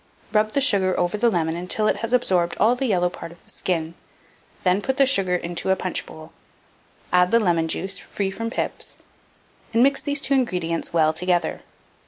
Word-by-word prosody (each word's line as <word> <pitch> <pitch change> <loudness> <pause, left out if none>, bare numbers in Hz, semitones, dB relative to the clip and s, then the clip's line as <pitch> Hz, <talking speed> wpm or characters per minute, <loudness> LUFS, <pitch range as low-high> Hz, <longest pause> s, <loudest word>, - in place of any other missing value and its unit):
] - - -32
Mode. - - -13
Rub 215 0 +3
the 280 - +2
sugar 195 -9 +2
over 175 +2 0
the 235 +3 +3
lemon 165 -5 0
until 180 +5 0
it - - +1
has 230 0 -3
absorbed 185 -9 +1
all 225 +3 +4
the 260 +1 -1
yellow 180 -5 +2
part 170 -1 -8
of 170 - -17
the - - -15
skin, 165 -3 -2 0.7
then 185 +2 +2
put 265 +5 -2
the 275 - +5
sugar 195 -9 +2
into 175 +1 -3
a 190 - +4
punchbowl; 165 -3 -5 0.8
add 180 0 +5
the 230 - +4
lemon 170 -6 +1
juice 190 +4 -2
(free 195 -2 -3
from 230 +4 -4
pips), - - -3 0.8
and 235 - +5
mix 275 +1 +3
these 285 -1 0
two 275 - +1
ingredients 180 -11 -1
well 160 -2 +3
together. 175 +1 -1
185 Hz, 200 wpm, -23 LUFS, 175-230 Hz, 0.8 s, the